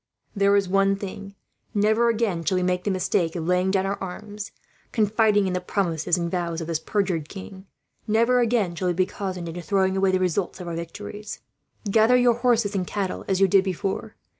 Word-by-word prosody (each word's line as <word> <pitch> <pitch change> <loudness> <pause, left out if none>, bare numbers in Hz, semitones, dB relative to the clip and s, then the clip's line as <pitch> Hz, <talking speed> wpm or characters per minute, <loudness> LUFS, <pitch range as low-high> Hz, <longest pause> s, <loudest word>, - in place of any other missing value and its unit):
There 200 0 +4
is 200 -1 +2
one 195 +1 +3
thing: 200 0 -8 0.4
never 220 +3 +3
again 215 -7 0
shall 185 +3 +1
we 180 - +1
make 180 0 0
the - - +1
mistake 185 -3 0
of 165 -2 -3
laying 180 +2 +2
down 190 0 +1
our 195 +1 -3
arms, 205 +3 -7 0.4
confiding 215 -2 +3
in 185 - -1
the 180 - -1
promises 175 -3 0
and 170 -1 -2
vows 170 -2 -2
of 165 - -4
this 165 -1 -1
perjured 180 -5 -1
king; 190 0 -10 0.4
never 230 +3 +3
again 225 -7 +1
shall 180 +2 -2
we 175 - +1
be 185 +1 +3
cozened 185 -3 -5
into 170 +2 -6
throwing 190 +1 +1
away 195 0 +2
the 185 - +2
results 185 +1 -1
of 180 - -7
our 170 - -4
victories. 205 +5 -7 0.5
"Gather 220 +4 +5
your 245 -1 +4
horses 235 -3 +1
and 185 -3 -1
cattle, 195 -3 -3
as 190 -1 +1
you 195 - +5
did 190 +1 +4
before. 195 +3 -3
195 Hz, 205 wpm, -24 LUFS, 180-210 Hz, 0.5 s, Gather